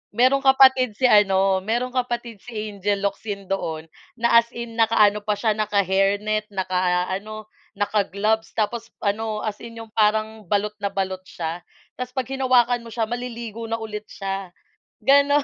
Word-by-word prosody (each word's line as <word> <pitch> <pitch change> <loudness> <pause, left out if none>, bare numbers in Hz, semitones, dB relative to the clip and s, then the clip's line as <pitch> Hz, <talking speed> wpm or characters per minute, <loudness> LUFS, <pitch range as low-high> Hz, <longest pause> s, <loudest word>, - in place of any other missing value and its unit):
Merong 260 +3 +4
kapatid 260 -3 +5
si 260 - +1
ano, 195 -3 +4
merong 240 +4 -1
kapatid 240 -4 -3
si 245 - -10 0.2
Angel 200 0 -1
Locsin 200 0 -3
doon 160 -4 -3 0.3
na 235 0 +6
as 230 - -16
in 235 -1 -6
nakaano 215 -2 +4
pa 210 0 0
siya, 220 +1 +1
naka-hairnet, 205 +1 +1
nakaano, 185 +3 -1 0.3
naka-gloves 205 +1 0
tapos 230 +2 -2
ano, 215 +1 -1
as 210 -1 -4
in 230 -1 -9
yung 225 - -16
parang 215 -1 +1
balot 205 +2 +1
na 200 - -1
balot 190 -1 -2
siya 165 +1 -5 0.4
tapos 250 0 -4
'pag 260 -2 -1
hinawakan 250 -2 +3
mo - - -11
siya 225 +1 -1
maliligo 235 -2 -5
na 225 - -1
ulit 215 -1 -6
siya, 195 -2 -4 0.5
gano'n. 285 +1 +5
215 Hz, 150 wpm, -23 LUFS, 200-235 Hz, 0.5 s, na